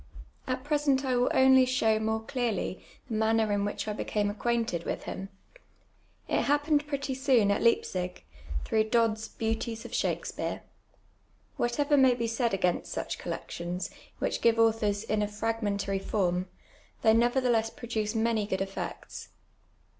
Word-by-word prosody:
At 255 Hz, 0 st, -2 dB
present 290 Hz, -2 st, +1 dB
I 260 Hz, -, +1 dB
^vill 245 Hz, 0 st, +2 dB
only 265 Hz, 0 st, +6 dB
show 225 Hz, -4 st, +2 dB
more 220 Hz, 0 st, -1 dB
clearly 230 Hz, -6 st, -2 dB, 0.2 s
the -, -, -5 dB
manner 220 Hz, 0 st, +2 dB
in 200 Hz, 0 st, +1 dB
which 205 Hz, -, -3 dB
I 210 Hz, -, -1 dB
became 205 Hz, -1 st, -1 dB
acquainted 225 Hz, -5 st, -1 dB
with -, -, -3 dB
him. 195 Hz, +1 st, -6 dB, 1.0 s
It -, -, +1 dB
happened 295 Hz, +1 st, +2 dB
pretty 280 Hz, -2 st, -2 dB
soon 255 Hz, -6 st, +3 dB
at 200 Hz, -, +1 dB
Leipzig, 180 Hz, -6 st, 0 dB, 0.4 s
through 220 Hz, -1 st, +2 dB
Dodd's 225 Hz, -1 st, +2 dB
Beauties 225 Hz, 0 st, -3 dB
of -, -, -9 dB
Shakspeare. -, -, -2 dB, 1.0 s
"Wliatever 285 Hz, +4 st, +2 dB
may 260 Hz, -2 st, +5 dB
be 235 Hz, -1 st, -2 dB
said 230 Hz, +1 st, 0 dB
against 180 Hz, -2 st, 0 dB
such -, -, -4 dB
collections, 175 Hz, +2 st, -4 dB, 0.3 s
which -, -, -2 dB
give 230 Hz, -1 st, +4 dB
authors 220 Hz, -2 st, +2 dB
in 215 Hz, -1 st, 0 dB
a 210 Hz, -, +1 dB
fragmentary 210 Hz, -2 st, -1 dB
form, 185 Hz, -2 st, 0 dB, 0.6 s
they 220 Hz, -1 st, +6 dB
nevertheless 240 Hz, -1 st, +2 dB
produce 225 Hz, -2 st, -3 dB
many 220 Hz, -2 st, +1 dB
good 190 Hz, -2 st, -1 dB
effects. 195 Hz, 0 st, -6 dB
225 Hz, 145 wpm, -29 LUFS, 210-250 Hz, 1.0 s, only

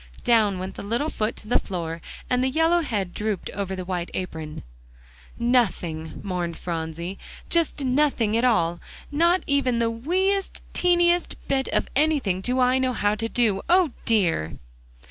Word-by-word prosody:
Down 215 Hz, -5 st, +3 dB
went 185 Hz, +1 st, -5 dB
the -, -, -8 dB
little 235 Hz, +9 st, -1 dB
foot 215 Hz, +1 st, -1 dB
to 215 Hz, -, -12 dB
the 245 Hz, -, +3 dB
floor, 170 Hz, -3 st, -5 dB, 0.3 s
and 250 Hz, 0 st, +1 dB
the 260 Hz, -, +2 dB
yellow 325 Hz, +5 st, +3 dB
head 205 Hz, -, -2 dB
drooped 210 Hz, -3 st, -3 dB
over 195 Hz, -1 st, -3 dB
the 185 Hz, -1 st, -5 dB
white 175 Hz, -1 st, -3 dB
apron. 160 Hz, -4 st, -5 dB, 0.7 s
"Nothing," 190 Hz, -10 st, 0 dB
mourned 180 Hz, -4 st, -3 dB
Phronsie, 170 Hz, +2 st, -4 dB, 0.3 s
"just 330 Hz, -4 st, +1 dB
nothing 255 Hz, -5 st, +2 dB
at 230 Hz, -, +2 dB
all; 175 Hz, -9 st, +2 dB, 0.3 s
not 340 Hz, +5 st, +3 dB
even 275 Hz, -4 st, +2 dB
the 230 Hz, -1 st, +1 dB
wee 350 Hz, +12 st, +1 dB
est 390 Hz, -1 st, -4 dB
teeniest 350 Hz, 0 st, +3 dB
bit 270 Hz, -1 st, +1 dB
of -, -, 0 dB
anything 275 Hz, -11 st, +2 dB
do 250 Hz, +5 st, 0 dB
I 255 Hz, +1 st, +4 dB
know 260 Hz, -1 st, +1 dB
how 205 Hz, -3 st, +1 dB
to 225 Hz, +2 st, -2 dB
do. 220 Hz, -6 st, +1 dB
O, 355 Hz, -4 st, +5 dB
dear!" 165 Hz, -, +1 dB
230 Hz, 165 wpm, -24 LUFS, 185-275 Hz, 0.7 s, O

